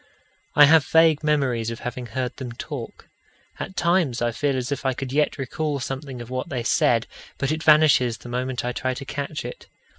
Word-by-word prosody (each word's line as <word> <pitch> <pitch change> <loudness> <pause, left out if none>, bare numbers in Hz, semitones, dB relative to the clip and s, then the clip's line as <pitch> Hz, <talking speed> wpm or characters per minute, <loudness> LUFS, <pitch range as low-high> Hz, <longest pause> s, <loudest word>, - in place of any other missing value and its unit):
I 145 - +9
have 160 +1 +6
vague 160 -1 +4
memories 135 -7 +1
of 115 - -6
having 125 0 -5
heard 125 +1 -4
them 125 -3 -6
talk. - - -7 0.5
At 190 - -6
times 170 -9 +1
I 120 0 0
feel 140 +3 -1
as 125 +1 -3
if 140 - -3
I 130 -1 0
could 135 0 -5
yet 150 +1 +1
recall 145 +2 -2
something 135 -1 -5
of 120 - -13
what 130 0 -3
they 125 -3 -3
said, 115 0 +2 0.3
but 135 +1 -1
it 155 0 -2
vanishes 150 -7 +5
the - - -12
moment 125 +1 -3
I 125 - -1
try 130 +1 -2
to 140 - -7
catch 145 +2 -4
it. - - -8
135 Hz, 205 wpm, -23 LUFS, 125-150 Hz, 0.5 s, I